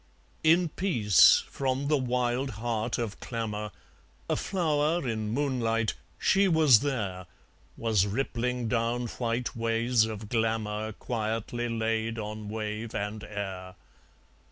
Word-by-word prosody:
In 165 +2 +4
peace 120 - +5
from 135 +1 -2
the 150 - +3
wild 125 0 0
heart 115 0 -1
of 115 -4 -4
clamour, 105 -3 -4 0.6
A - - +1
flower 160 -4 0
in 110 -2 -2
moonlight, 115 -4 0 0.2
she 195 0 +3
was 155 - +6
there, 100 -10 -3 0.5
Was 110 -4 +2
rippling 125 +1 -1
down 120 +1 0
white 120 +1 -2
ways 115 0 +2
of 110 -1 -6
glamour 110 -1 -1
Quietly 115 +2 -3
laid 115 0 -1
on 105 -1 -5
wave 110 +1 -4
and 105 +1 -3
air. 95 -3 -6
115 Hz, 115 wpm, -28 LUFS, 110-125 Hz, 0.6 s, was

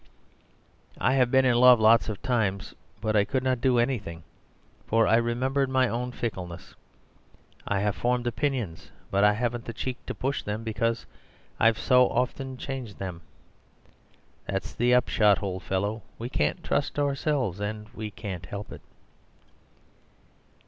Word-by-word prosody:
I 130 - +2
have 130 -2 +3
been 130 +1 +4
in 125 - +4
love 125 -1 +7
lots 110 -1 +5
of 105 - -5
times, 110 -7 -1 0.3
but 110 0 0
I 105 - +5
could 130 +5 -2
not 130 -2 0
do 130 -1 +3
anything, 110 -10 -1 0.6
for 115 0 +3
I - - +4
remembered 130 +4 0
my 130 -1 +3
own 125 +2 -3
fickleness. 95 -8 -6 0.9
I 100 -1 0
have 105 -2 0
formed 125 0 0
opinions, 120 - -2 0.2
but 100 +1 +2
I 105 0 +6
haven't 120 +1 -2
the 115 - -5
cheek 125 +1 -5
to - - -4
push 135 +1 -2
them, 105 +2 -4
because 115 +1 -1 0.5
I've 115 0 +4
so 125 0 +4
often 130 +1 -2
changed 130 -6 -6
them. 90 -3 -6 1.3
That's 95 0 -3
the 120 +1 +1
upshot, 105 -5 +3
old 95 -2 -3
fellow. 100 +5 -2 0.2
We 120 +2 -5
can't 75 - -1
trust - - -1
ourselves— 140 - 0
and 105 +1 -4
we 110 -2 -6
can't 95 -5 -7
help 100 +3 -7
it." - - -9
115 Hz, 150 wpm, -27 LUFS, 105-125 Hz, 1.3 s, love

